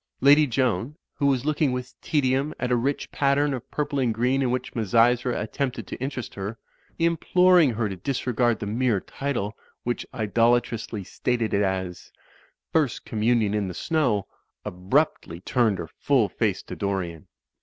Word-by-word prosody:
Lady 145 +3 +6
Joan, 125 0 0 0.2
who 140 - 0
was 135 -2 +1
looking 150 -2 +1
with 125 0 -5
tedium 140 0 0
at 125 - -1
a - - +4
rich 135 +4 -1
pattern 140 +1 +2
of 125 -2 -6
purple 145 -1 -2
and 125 -3 +2
green 125 +4 +1
in 130 - +1
which 125 +1 -2
Misysra 120 +3 +2
attempt 130 +4 -2
ed 115 - -6
to - - -6
interest 130 -3 -4
her 105 +3 -5 0.4
(imploring 170 -2 +4
her 110 -1 0
to 95 - -5
disregard 120 +2 0
the 105 - -5
mere 115 0 +1
title, 115 -3 -3 0.3
which 120 0 -3
idolatrously 115 -2 +1
stated 120 +3 -1
it 100 - +3
as 95 -2 -3 0.6
"First 150 -6 +1
Commun 115 +1 +1
ion 105 -1 0
in 105 -2 0
the 90 - -6
Snow"), 125 - 0 0.4
abruptly 90 - 0
turned 110 0 +1
her - - -6
full 130 -8 +3
face - - -1
to - - -8
Dorian. 90 -5 -3
120 Hz, 165 wpm, -25 LUFS, 105-140 Hz, 0.6 s, Lady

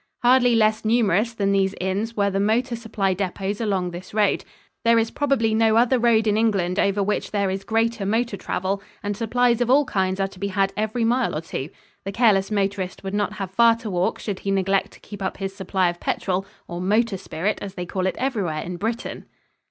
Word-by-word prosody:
Hardly 245 -1 +5
less 215 -1 +2
numerous 220 -1 +2
than 200 -2 +1
these 195 0 +1
inns 200 +5 -2
were 200 -1 +2
the 195 - -1
motor 235 +5 +1
supply 215 -4 -1
depots 195 +2 -3
along 190 -5 0
this 180 +4 -9
road. 210 -1 +2 0.4
There 230 0 +5
is 225 0 +1
probably 270 -6 +1
no 220 0 +3
other 245 +2 +4
road 230 -2 +3
in 210 -1 +2
England 200 -5 +1
over 200 0 +2
which 210 +2 -1
there 200 -2 0
is 195 +1 -4
greater 225 0 0
motor 225 +2 0
travel, 190 +1 -2 0.2
and 205 0 -2
supplies 235 +2 +1
of 245 - +1
all 285 +3 +5
kinds 190 -4 -1
are 195 - +1
to 190 - -15
be 200 - -1
had 195 0 0
every 220 +2 -1
mile 245 -2 +1
or 155 - -2
two. 155 -3 -5 0.3
The 195 - -4
careless 200 -3 +3
motorist 200 -3 -2
would 195 0 -5
not 205 0 0
have 195 -3 -5
far 230 +3 +5
to 225 -2 -6
walk 180 0 0
should 200 -3 -4
he 200 - -4
neglect 195 0 +1
to - - -16
keep 205 -1 -10
up 190 - -3
his 195 0 -4
supply 190 -1 0
of 175 - -13
petrol 190 +1 -1 0.2
or 175 0 -5
motor 210 +3 +2
spirit, 190 +2 -2
as 195 -1 -7
they 180 - -4
call 185 +1 -2
it - - -1
everywhere 195 - -1
in 180 0 -5
Britain. 225 +5 -4
205 Hz, 215 wpm, -23 LUFS, 190-225 Hz, 0.4 s, Hardly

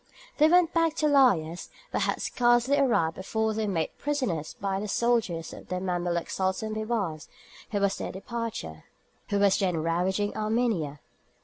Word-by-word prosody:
They 305 - +7
went 350 0 +4
back 330 -2 +2
to 310 - 0
Laïas, 200 - +3 0.2
but - - -1
had - - 0
scarcely 240 +3 +3
arrived 210 -12 +2
before 220 +3 -1
they 215 0 -1
were - - -1
made 165 -4 -2
prisoners 255 - -2
by 195 -1 -1
the 210 - -4
soldiers 210 -8 0
of - - -11
the 180 - -2
Mameluke 175 -2 -1
Sultan 190 +3 -1
Bibars, 215 -8 -2 0.4
who 205 - -1
was 200 -1 +1 1.6
then 180 -4 +1
ravaging 180 +5 0
Armenia. 215 -10 -1
205 Hz, 140 wpm, -27 LUFS, 175-240 Hz, 1.6 s, They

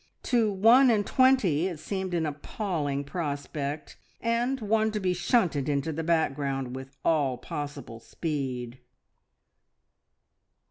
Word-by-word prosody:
To 230 -4 +2
one 230 +7 +6
and 210 -3 +2
twenty 220 - +3
it 175 -4 -5
seemed 190 +2 -3
an 165 -2 0
appalling 150 -1 -3
prospect, 145 -1 -4 0.2
and 240 +3 0
one 220 0 +1
to 210 - -1
be 185 -2 +1
shunted 170 - +1
into 145 +2 0
the 165 +2 -3
background 140 -5 0
with 135 +1 -9
all 145 -6 +2
possible 145 -6 -6
speed. 130 -2 -4
160 Hz, 120 wpm, -27 LUFS, 140-210 Hz, 0.2 s, one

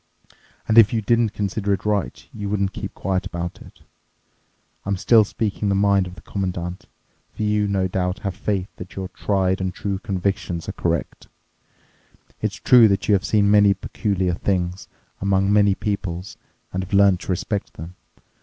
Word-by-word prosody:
And 110 +1 +6
if 110 - +7
you 110 -2 0
didn't 115 +2 +2
consider 100 0 -2
it 95 - -3
right, 105 -3 -2
you 105 -2 -5
wouldn't 100 -2 -1
keep - - -6
quiet 95 0 -2
about 85 0 -5
it—I'm 100 0 -11
still 110 +3 +5
speaking 105 0 -2
the 100 - +2
mind 100 -1 +3
of 90 - -10
the 85 - -13
Commandant—for 90 +2 -6
you 105 -1 +1
no 95 -2 0
doubt 90 0 -1
have 100 - -1
faith 95 0 -2
that - - -10
your 95 -1 -5
tried 95 -1 0
and 95 0 -1
true 100 +1 -3
convictions 95 -3 -2
are - - -2
correct. 85 -2 -3 1.1
It's - - -1
true 120 -3 +6
that 100 -1 0
you 105 - +4
have 95 -2 +2
seen 100 -1 +2
many 100 -1 +5
peculiar 95 -1 -1
things 90 0 -2 0.3
among 100 +1 +2
many 100 -1 +4
peoples 95 -3 -4 0.4
and 95 0 -1
have 95 - -9
learned 100 -2 +5
to - - -5
respect 100 +3 -3
them. 80 +3 -9
100 Hz, 165 wpm, -22 LUFS, 95-105 Hz, 1.1 s, if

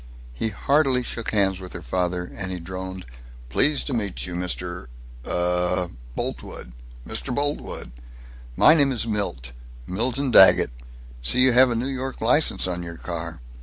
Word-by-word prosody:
He 110 - -2
heartily 135 +4 +1
shook 115 -1 -3
hands 95 -3 +2
with 90 -1 -10
her - - -8
father, 90 +5 -1
and 95 -1 -4
he 90 - -4
droned, 95 +1 -7 0.4
"Pleased 145 - +3
to 140 - -3
meet 105 -5 -2
you, 90 - -7
Mr. 90 -3 -4 0.4
Uh." 90 0 +1 0.3
"Boltwood." - - -5 0.4
"Mr. 120 +3 -3
Boltwood. 145 - -3 0.6
My 155 - +7
name 145 -4 +3
is 115 -4 0
Milt 100 - -3 0.3
Milton 125 - -1
Daggett. 95 - +7 0.5
See 65 - +4
you 130 0 +5
have 125 +1 +6
a 120 - -1
New 115 +2 -1
York 135 0 -4
license 125 +7 +3
on 90 -1 -3
your 85 -1 -8
car. 85 -5 -6
95 Hz, 155 wpm, -23 LUFS, 90-125 Hz, 0.6 s, My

